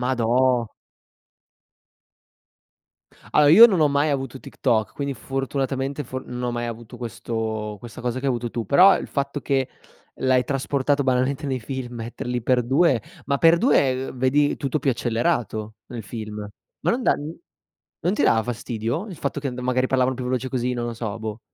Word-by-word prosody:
Madò. 125 0 +2 2.7
Allora 150 -1 +5
io 190 +11 +10
non 195 -7 +2
ho 150 - +5
mai 145 +2 +1
avuto 135 -2 -3
TikTok 110 -7 -1
quindi 140 -1 -3
fortunatamente 135 +1 -3
for 130 0 -6
non 125 0 -6
ho 125 - 0
mai 120 0 -3
avuto 115 +1 -8
questo 110 -1 -4
questa 115 +3 -10
cosa 125 +1 -2
che 135 - -5
hai - - +2
avuto 120 -1 -3
tu. 115 -2 -3
Però 185 - +6
il - - -6
fatto 140 0 -3
che 135 -2 0 0.5
l'hai 130 -1 +3
trasportato 140 +2 0
banalmente 130 +3 0
nei 130 -2 -1
film, 125 0 -6
metterli 120 +1 -4
x2 130 +3 +2 0.2
Ma 140 - +1
x2, 145 - +3
ehm, - - -8
vedi 140 +3 +2
tutto 140 +2 -1
più 140 - +1
accelerato, 115 -2 -1
nel 115 -2 -7
film. 105 -2 -6 0.3
Ma - - +2
non 245 - -1
dà - - +4 0.9
non 180 - 0
ti - - 0
dava 110 -1 +4
fastidio 120 - -3
il 185 -6 -8
fatto 140 +1 -3
che 140 - -3
an 125 - -4
magari 130 0 +1
parlavano 130 0 +1
più 130 - -5
veloce, 130 +1 -1
così? 125 -1 -1
Non 120 -1 -3
lo 120 - -3
so, 110 -2 -4
boh. 110 0 -5
130 Hz, 175 wpm, -23 LUFS, 120-140 Hz, 2.7 s, io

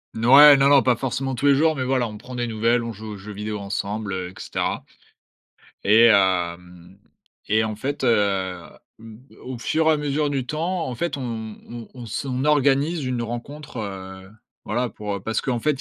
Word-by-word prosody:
N 110 - -3
ouais, 145 +2 +9
non, 135 0 +4
non! 140 -2 +6
Pas 125 -1 +3
forcément 135 +2 -3
tous 135 +3 0
les 140 - +6
jours, 160 +3 +3
mais, 130 - -2
voilà, 130 -2 0
on 105 -1 -9
prend 125 +3 -10
des 120 0 -1
nouvelles. 115 +2 +1
On 115 -1 -5
joue 110 +1 -8
aux - - -8
jeux 100 +2 -10
vidéo 105 +1 -5
ensemble 100 +1 -4
et 90 -1 -4
cetera - - -3 1.0
et 110 +3 +6
hem, 90 -3 +1 0.5
et 110 +1 +3
en 110 - -4
fait, 135 +6 -4
heu, 100 -6 +1 0.4
b 110 0 -12 0.2
au 130 -1 -7
fur 160 +7 0
et 160 - +5
à - - 0
mesure 150 0 -1
du 135 -3 -2
temps, 165 +5 -2
en 125 - -5
fait, 170 +5 -2
on 115 -4 -5
on 120 -1 -9
on 125 -2 -9
s 110 - -4
on 130 0 -2
organise 145 +2 +2
une 125 -2 -2
rencontre, 125 +5 -7
heu, 95 -2 -7 0.4
voilà, 120 +3 -1
pour, 105 -2 -5
heu - - -5
parce 110 +3 -2
qu'en 125 -3 -1
fait, 150 - +1
120 Hz, 205 wpm, -23 LUFS, 105-135 Hz, 1.0 s, ouais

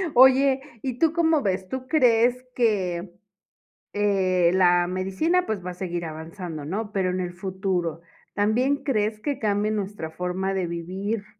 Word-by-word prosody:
Oye, 265 +1 +6 0.2
¿y 255 -2 -4
tú 320 -1 +3
cómo 325 -3 +3
ves? 190 -3 -1
¿Tú 260 0 -5
crees 250 -4 +3
que, 190 -6 0 0.8
eh 190 -4 +2
la 175 -1 +4
medicina, 195 - 0
pues, 200 -5 -3
va 180 - -3
a - - -7
seguir 175 -2 -4
avanzando, 160 0 -7
¿no? 205 +7 -4
Pero 190 -2 0
en 185 0 -2
el 175 -1 -3
futuro, 185 -3 -2 0.3
¿también 250 +7 +1
crees 215 -4 0
que 285 0 -2
cambie 210 -2 0
nuestra 200 -6 -3
forma 180 +3 -2
de 190 -2 -1
vivir 190 +6 -4
195 Hz, 155 wpm, -25 LUFS, 180-240 Hz, 0.8 s, Oye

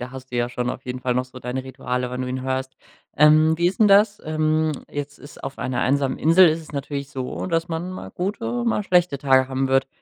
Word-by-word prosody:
da 125 0 -6
hast 130 0 -10
du 125 - -4
ja 120 0 0
schon 125 0 -3
auf 125 - -5
jeden 125 0 -5
Fall 125 -1 -1
noch 125 +1 0
so 130 0 -12
deine 125 +1 -4
Rituale, 125 -1 -3
wenn 125 0 -4
du 130 - -3
ihn 130 0 -3
hörst. 130 0 -3 0.4
Ähm, 155 +2 +6
wie 170 +1 +2
ist 185 +4 -1
'n 215 - +6
das? 205 +1 +4
Ähm, 155 0 +1 0.2
jetzt 145 0 -6
ist 145 - -13
auf 135 - -6
einer 130 -1 -2
einsamen 135 +1 +1
Insel 165 +2 +6
ist 160 +1 -2
es 160 - -13
natürlich 140 0 -4
so, 130 +4 -5
dass 165 -2 0
man 170 +2 -4
mal 185 - -8
gute, 230 +6 -3
mal 225 -3 +1
schlechte 180 -5 +2
Tage 130 -1 +3
haben 135 0 -1
wird. 135 0 +2
140 Hz, 245 wpm, -22 LUFS, 130-165 Hz, 0.4 s, Ähm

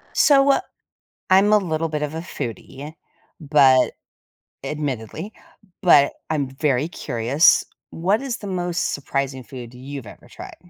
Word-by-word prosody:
So, 280 -2 +5
uh 275 - +3 0.7
I'm 195 +3 +5
a - - +7
little 165 -4 -2
bit 155 -1 -4
of 150 0 -3
a 160 - -4
foodie, 140 0 -7 0.5
but, 140 -4 +4 0.7
admittedly, 145 - -5 0.5
but 145 -7 +5 0.2
I'm 150 -3 -1
very 135 +1 0
curious. 135 -2 +2 0.2
What 190 +7 0
is 265 -3 -4
the 205 - -9
most 175 -2 -2
surprising 140 -1 -3
food 120 0 -10
you've 135 +1 -8
ever - - -14
tried? - - -10
150 Hz, 135 wpm, -22 LUFS, 135-175 Hz, 0.7 s, a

